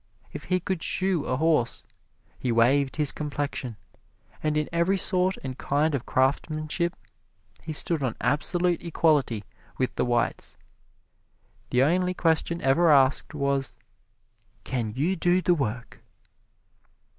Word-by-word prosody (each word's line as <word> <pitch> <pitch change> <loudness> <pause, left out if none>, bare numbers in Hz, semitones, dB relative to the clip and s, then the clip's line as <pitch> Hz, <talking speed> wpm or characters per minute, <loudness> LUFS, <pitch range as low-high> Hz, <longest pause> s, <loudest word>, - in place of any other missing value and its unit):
If - - -7
he 185 0 +1
could 185 -1 -3
shoe 185 -4 0
a 130 - -1
horse, 155 -6 +1 0.6
we 125 - 0
waived 130 +4 +3
his 150 -2 +3
complexion; 145 -6 -4 0.6
and 155 0 0
in 150 - 0
every 170 +4 +1
sort 185 -1 +1
and 130 -1 -6
kind 150 +2 +1
of 135 -4 -3
craftsmanship 155 +5 0 0.7
he 160 - -6
stood 155 +1 0
on 130 -4 -1
absolute 175 +4 +1
equality 150 -10 +1 0.3
with 130 - -1
the - - +2
whites. 120 -1 -1 1.1
The 125 +1 +3
only 180 +5 +1
question 165 0 +1
ever 160 +6 +4
asked 135 -1 +3
was, 140 -1 -1 0.9
"Can 120 -4 -3
you 160 +8 0
do 175 +1 +2
the 180 -1 +2
work?" 125 -6 -4
150 Hz, 130 wpm, -26 LUFS, 130-170 Hz, 1.1 s, ever